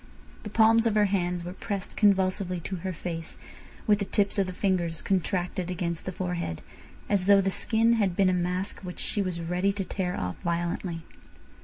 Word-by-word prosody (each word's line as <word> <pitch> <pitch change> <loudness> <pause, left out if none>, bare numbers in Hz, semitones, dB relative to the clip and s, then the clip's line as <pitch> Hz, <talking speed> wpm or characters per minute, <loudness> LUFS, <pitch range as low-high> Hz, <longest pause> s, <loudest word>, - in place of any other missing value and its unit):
The 210 - -7
palms 225 +2 +5
of 220 - +1
her 210 -1 +5
hands 180 -3 0
were 175 +1 -6
pressed 195 0 -5
convulsively 190 -2 +2
to 190 +4 -4
her 185 +2 -3
face, 165 -1 -5 0.5
with 210 -2 +4
the 200 - -1
tips 200 +1 +1
of 195 - +2
the - - -3
fingers 180 -4 0
contracted 180 -1 -1
against 170 -2 -3
the 185 - -2
forehead, 175 - -3 0.4
as 200 -2 +1
though 200 -1 +7
the 195 0 +1
skin 225 +3 +3
had 200 -6 +1
been 195 - +3
a 185 - +3
mask 180 +2 -1
which 180 -2 -8
she 205 - -1
was 180 -3 -2
ready 180 +4 +1
to 195 -1 -3
tear 180 -2 -2
off 90 0 -3
violently. 170 0 -2
185 Hz, 190 wpm, -27 LUFS, 175-200 Hz, 0.5 s, though